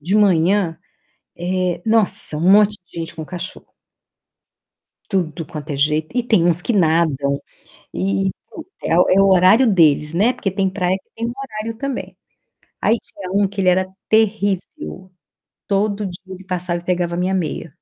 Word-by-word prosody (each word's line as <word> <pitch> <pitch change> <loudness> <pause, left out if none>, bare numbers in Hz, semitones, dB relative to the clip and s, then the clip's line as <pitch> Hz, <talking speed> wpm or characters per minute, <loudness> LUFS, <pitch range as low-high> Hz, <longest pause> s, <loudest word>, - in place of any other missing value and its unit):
de 180 +8 0
manhã, 185 -3 +3 1.1
nossa, 215 -8 +2
um 175 +5 +3
monte 210 0 +5
de 170 0 -9
gente 165 +1 -6
com 160 - -6
cachorro. 180 +2 -8 1.3
Tudo 170 -5 -2
quanto 150 -2 -7
é - - -2
jeito, 155 - 0
e 245 - +3
tem 215 -8 +3
uns 175 0 +2
que 235 - -1
nadam, 155 -6 +1 0.5
e, 95 +1 0 0.5
é 165 - +1
o 180 - +5
é 195 +1 +5
o 195 - +5
horário 190 +7 +5
deles, 150 -3 +3
né, 215 +9 +3
porque 195 - -2
tem 190 0 0
praia 185 -1 0
que 190 - -25
tem 230 +1 -3
horário 225 -4 -6
também. 275 0 -5 0.6
Aí 230 - +3
tinha 185 -2 -10
um 200 0 +2
que 200 0 -5
ele 185 - +2
era 185 +1 +2 0.2
terrível, 200 -3 -1 0.6
todo 205 0 0
dia 180 0 -8
ele 185 - -12
passava 180 -2 -2
pegava 175 -1 -1
a - - -3
minha 185 +1 0
meia. 165 -3 -3
185 Hz, 160 wpm, -19 LUFS, 165-205 Hz, 1.3 s, monte